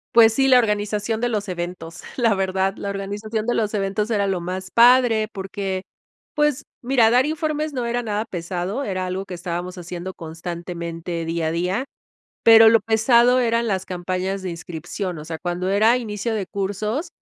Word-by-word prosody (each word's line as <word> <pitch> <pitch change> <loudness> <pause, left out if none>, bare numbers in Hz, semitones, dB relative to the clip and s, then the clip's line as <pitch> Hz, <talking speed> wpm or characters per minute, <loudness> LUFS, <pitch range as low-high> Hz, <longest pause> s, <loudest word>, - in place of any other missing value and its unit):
Pues 225 -1 +7
sí, 270 +2 +2
la 255 -1 +7
organización 210 0 -1
de 245 - +1
los 210 -3 -2
eventos, 175 -1 -6
la 230 -4 +3
verdad, 190 0 0
la 200 - -4
organización 205 +2 -4
de 240 - +1
los 215 -1 0
eventos 205 +2 -1
era 205 -3 +1
lo 190 -3 -1
más 185 +2 -5
padre 235 -2 +5
porque, 195 -1 -4 0.5
pues, 295 -1 +1 0.2
mira, 240 -3 +3
dar 250 +2 +4
informes 305 0 -2
no 250 -3 -2
era 240 +1 -1
nada 215 0 -2
pesado, 180 +7 -4
era 185 -5 -2
algo 185 +2 -3
que 185 - -8
estábamos 175 +1 -5
haciendo 180 +1 -6
constantemente, 170 0 -6
día 165 0 -1
a - - 0
día, 180 +9 -1 0.6
pero 225 -1 +8
lo 225 0 +5
pesado 235 +2 +4
eran 235 0 +1
las 190 -2 -1
campañas 185 +1 -3
de 185 - -3
inscripción, 175 +1 -5
o 150 - -8
sea, 160 0 -6
cuando 175 +1 -3
era 220 +5 +4
inicio 220 -1 -3
de 200 -4 -2
cursos, 210 - -3
200 Hz, 180 wpm, -22 LUFS, 180-230 Hz, 0.6 s, pero